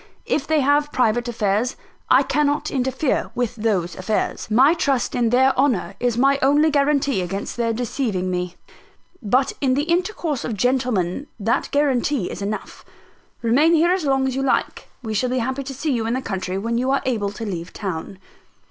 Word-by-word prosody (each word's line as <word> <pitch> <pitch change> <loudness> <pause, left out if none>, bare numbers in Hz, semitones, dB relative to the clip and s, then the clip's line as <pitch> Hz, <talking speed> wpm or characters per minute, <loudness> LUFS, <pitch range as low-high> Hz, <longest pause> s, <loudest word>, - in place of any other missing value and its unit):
If - - -1
they 315 -2 +2
have 290 +2 +2
private 240 0 +1
affairs, 220 +1 0 0.3
I 260 +2 +6
cannot 290 +2 0
interfere 265 +1 0
with 245 0 -1
those 205 -6 -1
affairs. 210 +3 -2
My 260 +8 +5
trust 280 -7 0
in 240 -2 +1
their 260 +3 +4
honour 250 -8 +1
is 240 -2 0
my 275 +2 +3
only 290 +4 +4
guarantee 280 -6 +2
against 195 +3 -4
their 235 -1 0
deceiving 220 -5 -2
me; 180 0 -3 0.7
but 255 +4 +1
in 260 -2 +2
the 285 - +1
intercourse 340 - -1
of 225 -4 -3
gentlemen 245 -2 0
that 225 +3 0
is - - -7
guarantee 280 -5 0
enough. 205 +1 -5 0.6
Remain 290 +9 +4
here 335 +2 +3
as 370 -2 0
long 270 -2 +1
as 260 - -2
you 270 - -1
like: 270 - -1
we 220 -2 -3
shall 250 +4 0
be 255 - -1
happy 260 +3 -1
to 270 0 -6
see 295 +3 -2
you 230 -3 -1
in 235 - 0
the 260 - -2
country, 190 -3 -3
when 230 +4 -1
you 255 +2 0
are 275 0 +1
able 220 -6 0
to 225 - -6
leave 175 -4 -5
town." 190 -2 -5
250 Hz, 185 wpm, -21 LUFS, 215-280 Hz, 0.7 s, I